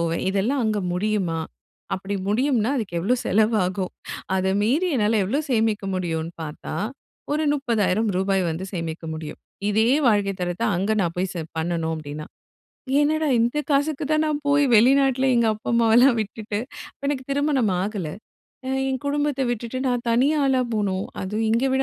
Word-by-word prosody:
போவேன். 165 0 -1
இதெல்லாம் 210 +8 0
அங்க 215 -1 +1
முடியுமா? 185 -3 0 0.6
அப்படி 195 +2 -4
முடியும்னா 245 +1 +2
அதுக்கு 205 -8 -3
எவ்வளோ 220 +9 +2
செலவாகும்? 200 -3 +1 0.4
அத 190 0 0 0.2
மீறி 275 - +2
என்னால 220 -2 +2
எவ்வளோ 255 +10 0
சேமிக்க 220 -4 +1
முடியும்னு 165 -2 -2
பார்த்தா, 150 -1 -6 0.6
ஒரு 305 +1 +1
30,000 225 -6 +1
ரூபாய் 190 0 +1
வந்து 165 +4 -4
சேமிக்க 165 -2 -4
முடியும். 155 -1 -7 0.3
இதே 220 +2 +3 0.2
வாழ்க்கை 205 -3 +2
தரத்த 175 +3 -2
அங்க 195 +5 0
நான் 170 -3 -1
போய் 185 +1 -1
செ 170 - -3 0.2
பண்ணணும் 160 0 -1
அப்படின்னா. 150 0 -7 0.8
என்னடா 310 +1 +1
இந்த 235 +5 +1
காசுக்கு 285 +2 +1
தான் 310 0 +3
நான் 300 -1 0
போய் 285 0 +4
வெளிநாட்டில 265 +3 +4
எங்க 235 -1 +3
அப்பா, 215 - -7
அம்மாவெல்லாம் 235 +2 +5
விட்டுட்டு 215 0 -4 0.3
அப்ப - - -34
எனக்கு 275 -2 -1
திருமணம் 275 -6 +1
ஆகல. 200 -4 -3 0.6
அ - - -3 0.2
என் 260 -2 -2
குடும்பத்தை 290 -1 0
விட்டுட்டு 240 +1 -3
நான் 245 -1 -1
தனி 245 +4 +4
ஆளா 265 -2 +3
போணும். 200 -3 0 0.2
அது 190 +2 -4 0.2
இங்க 230 +3 +2
விட 265 0 +2
220 Hz, 155 wpm, -23 LUFS, 185-265 Hz, 0.8 s, அம்மாவெல்லாம்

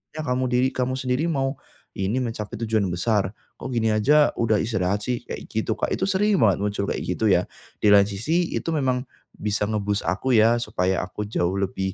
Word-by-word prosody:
Ya, 155 - -3
kamu 130 -1 0
diri 125 +1 +2
kamu 130 0 -2
sendiri 130 +3 -1
mau 135 -3 -1 0.4
ini 95 +6 -1
mencapai 115 -3 -4
tujuan 110 -2 +1
besar, 100 +2 0 0.2
kok - - -7
gini 115 -1 +1
aja 145 +8 +4
udah 110 -2 +2
istirahat 105 -3 -1
sih?" 125 -1 -2
Kayak - - -6
gitu, 110 0 -2
Kak. - - 0
Itu - - -4
sering 205 +1 +2
banget 100 -5 +4
muncul, 100 -1 -1
kayak - - -2
gitu 90 +5 -1
ya. 90 0 +4 0.4
Di 105 - +3
lain 100 -1 +7
sisi, 160 - 0
itu - - -2
memang 130 -3 0 0.3
bisa 105 0 -2
nge-boost 105 -1 -1
aku 100 +9 0
ya, 115 +2 +5
supaya 95 -5 0
aku 95 +3 -6
jauh 90 -2 0
lebih 95 -1 -2
110 Hz, 195 wpm, -24 LUFS, 100-130 Hz, 0.4 s, lain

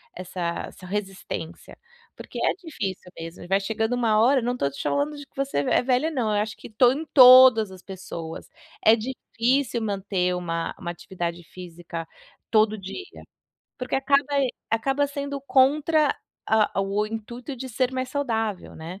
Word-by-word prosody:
essa 185 0 -8 0.3
essa 185 - -13
resistência, 195 -4 -5 0.4
porque - - -8
é - - +3
difícil 195 - -6
mesmo 165 +1 -8
e - - -10
vai 195 +1 +2
chegando 220 +3 -1
uma 225 -3 +2
hora 260 +4 +5
eu - - -7
não 245 +1 0
tô 140 - 0
te 140 - -12
chamando 290 +1 -1
de 290 - -8
que - - -42
você 275 - -1
é 145 - +2
velha 255 +5 +1
não, 225 -7 0
eu 205 - +2
acho 215 0 -4
que - - -11
to 240 +3 +4
em 300 +5 -3
todas 255 -5 +9
as 185 -1 -12
pessoas 175 -4 -8 0.4
é 220 +1 +8
difícil 245 +1 -1
manter 190 -3 -1
uma 165 -2 -3
uma 175 - -5
atividade 175 -1 -5
física 170 -1 -8 0.5
todo 215 -1 +3
dia, 200 - -9 0.6
porque 250 -1 -3
acaba 275 +1 +3 0.5
acaba 270 +5 +1
sendo 280 0 -5
contra 295 +3 +3 0.3
a 215 -2 +2
o 200 +2 0
intuito 235 +4 -6
de 260 +2 -6
ser 255 +2 0
mais 255 0 -2
saudável, 225 -8 -2
né. 170 +4 -8
220 Hz, 165 wpm, -25 LUFS, 190-265 Hz, 0.6 s, todas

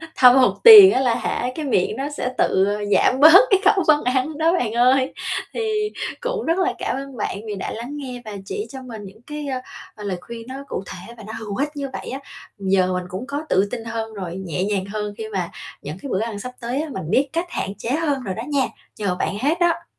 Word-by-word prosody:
thâm 250 0 +7
hụt 255 -2 +5
tiền 420 -5 +12
á 265 - +2
là 245 -3 +2
hả, 245 +1 -2
cái 310 -2 -4
miệng 190 -9 +1
nó 280 +2 -3
sẽ 250 - -1
tự 190 +1 +2 0.3
giảm 260 - +3
bớt 320 +6 +10
cái 390 - +5
khẩu 390 -2 +4
phân 300 -1 +4 0.3
đó 325 +2 +3
bạn 245 -11 0
ơi. 255 +3 +3 0.4
Thì 430 -2 -1 0.3
cũng - - -3
rất 330 +2 +1
là 375 0 +1
cảm - - -2
ơn 270 -2 -7
bạn 200 - -3
vì 205 - -4
đã 190 - -5
lắng 235 +5 -6
nghe 250 -3 -7
và 215 - -7
chỉ 420 - -4
cho 265 -1 -8
mình 230 -5 -9
những 205 +4 -13
cái, 300 -1 -5
ơ, 260 -2 -2 0.4
ờ, 210 - -10
lời 195 -3 -3
khuyên 230 +2 -9
nó 260 - -7
cụ - - -4
thể 190 +6 -9
và 220 - -11
nó 220 - -7
hữu 210 -2 -6
ích 285 +2 -1
như 280 -1 -4
vậy - - -6
á. 265 - -5 0.4
Giờ 190 -1 +2
mình 180 0 -2
cũng 205 +8 -6
có 285 +2 -3
tự 190 +2 +3
tin 235 -2 -4
hơn 225 -1 -4
rồi, 185 -4 -6
nhẹ 185 -2 -3
nhàng 195 -1 -1
hơn 210 +1 -4
khi 220 -1 -6
mà 185 -5 -3 0.3
những 150 +4 -7
cái 280 - -6
bữa 190 - +1
ăn 220 -1 -3
sắp 250 +5 -6
tới 245 +5 -2
á, 315 - -5
mình 190 - -5
biết 275 +6 +2
cách 345 +2 -2
hạn - - -3
chế 230 - -5
hơn 290 -4 0
rồi 190 -3 -4
đó 225 - -5
nha, 280 -3 +2 0.3
nhờ 200 -4 -1
bạn 180 +1 -2
hết 300 +8 0
đó. 345 -1 +1
250 Hz, 250 wpm, -21 LUFS, 205-295 Hz, 0.4 s, tiền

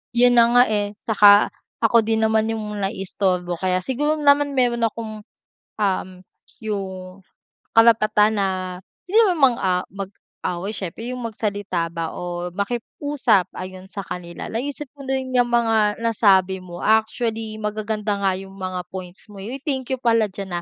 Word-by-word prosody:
Yun 245 +1 +6
na 230 - +7
nga, 245 - +8
eh. 205 0 -1
Saka 205 -1 +5 0.3
ako 230 +1 +5
din 220 0 +1
naman 220 0 +2
yung 210 -2 -4
naiistorbo 190 -2 -1
kaya 185 -1 0
siguro 295 +4 0
naman 285 -1 +3
meron 240 -2 +2
akong, 220 -1 -7 0.6
uhm, 185 -2 -2 0.3
yung 190 -4 -5 0.5
karapatan 215 -2 +4
na 195 - +2 0.6
hindi 425 - +2
naman 355 -6 0 0.2
mang-a 185 -1 +1 0.2
mag-away 195 -1 -6
siyempre, 215 +4 -6
'yong 250 - -5
magsalita 205 -6 -2
ba 165 -1 -4
o 175 0 -5
makiusap 235 - 0
ayun, 185 0 -8
sa 200 - -6
kanila. 170 -1 -7
Naisip 285 +6 -4
ko 285 - -12
din 265 -1 -2
'yang 245 -1 +3
mga 225 -3 +2
nasabi 195 -5 +3
mo. 175 -1 -9
Actually, 220 0 0
magaganda 210 0 -2
nga 195 - +3
'yong 195 0 -10
mga 185 -2 -5
points 185 0 -8
mo. 205 -2 -11
Uy, 240 +6 -5
thank 265 -4 -2
you 260 - 0
pala 230 -3 +2
diyan 190 -3 -5
210 Hz, 150 wpm, -22 LUFS, 190-230 Hz, 0.6 s, nga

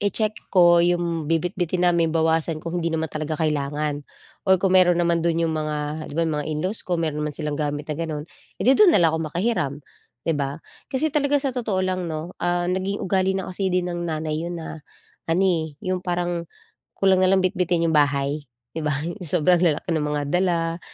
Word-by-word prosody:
i-check 210 +1 +1 0.2
ko 175 -1 +7
'yung 170 -3 0
bibitbitin 175 +2 0
namin, 170 -2 +3
bawasan 160 0 +1
kung 170 +1 -3
hindi 170 - 0
naman 160 0 0
talaga 155 0 -3
kailangan. 150 -1 -1 0.5
Or 190 - +7
kung 185 0 +1
meron 180 -2 +5
naman 170 -1 +2
do'n 170 0 +1
'yung 160 - 0
mga 155 0 -3
'di - - -9
ba, 165 - +2
'yung 160 -2 -1
mga 145 - -5
in-laws 180 +8 -1
ko 175 -2 0
meron 155 -2 -2
naman 150 -1 -2
silang 150 -1 -3
gamit 145 0 -2
na - - +1
gano'n, 155 -3 -3 0.3
eh, - - -4
'di 260 - +6
do'n 390 -6 +7
na - - +7
lang 165 - +5
ako 160 - 0
maki 175 +5 -3
hiram 145 - -1 0.4
'di 165 - +1
ba? 140 -1 -2 0.3
Kasi 290 +3 -1
talaga 290 -1 +2
sa 275 - -1
totoo 215 -7 -1
lang 185 -1 -1
'no, 160 +3 -5
ah, 175 0 +1
naging 190 +2 -2
ugali 190 0 +1
na 190 - -4
kasi 195 +1 -2
din 180 -1 0
ng 175 0 -3
nanay 155 0 -2
'yun 175 0 -4
na 160 -1 -7 0.5
ano, 170 +4 +2
eh, 160 -5 0
'yung 185 0 -1
parang 175 -1 -2 0.5
kulang 190 -1 +3
nalang 185 0 +3
bitbitin 175 -2 +1
'yung - - 0
bahay, 145 0 +2 0.3
'di 160 - -4
ba? 150 -2 0
'Yung 175 +4 -5
sobrang 175 +2 +3
lalaki 170 0 +1
ng 160 - +1
mga 150 0 -1
dala. 170 -2 +1
170 Hz, 210 wpm, -23 LUFS, 155-185 Hz, 0.5 s, ko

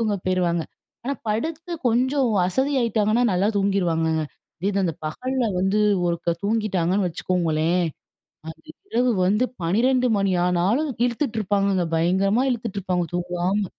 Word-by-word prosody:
தூங்க 215 -3 +1
போய்ருவாங்க. 175 -2 +1 0.4
ஆனா 280 +2 -1
படுத்து 320 +10 -3 0.2
கொஞ்சம் 255 +2 +2 0.2
அசதியாகிட்டாங்கன்னா, 235 -1 +1
நல்லா 190 +3 +2
தூங்கிருவாங்கங்க. 165 -5 +1 0.4
இதே 190 - 0
இது 200 0 0
அந்த 165 - -1
பகல்ல 255 +11 -2
வந்து 190 +3 +1 0.3
ஒருக்கா 170 0 -1
தூங்கிட்டாங்கன்னு 200 -3 +1
வச்சுக்கோங்களேன், 170 0 0 0.6
அந்த 160 - -10 0.3
இரவு 245 +2 +2 0.2
வந்து 210 +6 +2 0.2
12 250 +8 +2
மணி 195 -1 +1
ஆனாலும் 195 - +1
இழுத்துட்டுருப்பாங்கங்க, 205 - 0
பயங்கரமா 190 +8 +2
இழுத்துட்டுருப்பாங்க 200 -7 -2
தூங்காம. 180 +3 -1
200 Hz, 115 wpm, -23 LUFS, 180-235 Hz, 0.6 s, கொஞ்சம்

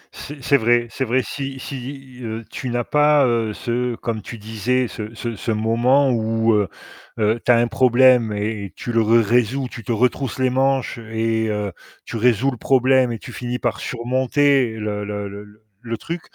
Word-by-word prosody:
C'est 145 -2 -9
c'est 140 +2 +4
vrai 120 0 +2
c'est 135 - -2
vrai 125 +2 +1
si 135 +1 -5
si, 135 -1 -8
heu, 115 -1 -5
tu 130 - -5
n'as 120 0 -1
pas, 150 +1 +4
heu, 115 -3 +1
ce 120 +2 -2
comme 115 -1 -4
tu 115 - -8
disais, 110 +4 -1
ce 110 -1 -7
ce 115 0 -4
ce 115 - -3
moment 120 +5 +3
où, 115 -1 +1
heu, 105 -2 +2 0.5
heu, 110 +1 +1
tu - - +4
as - - +6
un 120 - +3
problème 125 0 +4
et 105 -1 -3
tu 120 - -5
le 115 -1 +3
résous, 115 +3 +2
tu 115 - -8
te 110 - -4
retrousses 125 +3 0
les 130 -1 +1
manches 135 -1 0
et 110 0 -1
heu, 105 -1 -2 0.3
tu - - -5
résous 125 +3 +2
le 125 - -7
problème 130 0 +3
et 115 - -3
tu - - -11
finis 125 0 -3
par 120 -2 -2
surmonter 130 +1 +1
le 105 -1 -3
le 105 0 -4
le 100 +1 -9
le 105 +1 -20 0.2
le 115 0 -3
truc, 170 +9 -5
120 Hz, 195 wpm, -21 LUFS, 110-130 Hz, 0.5 s, as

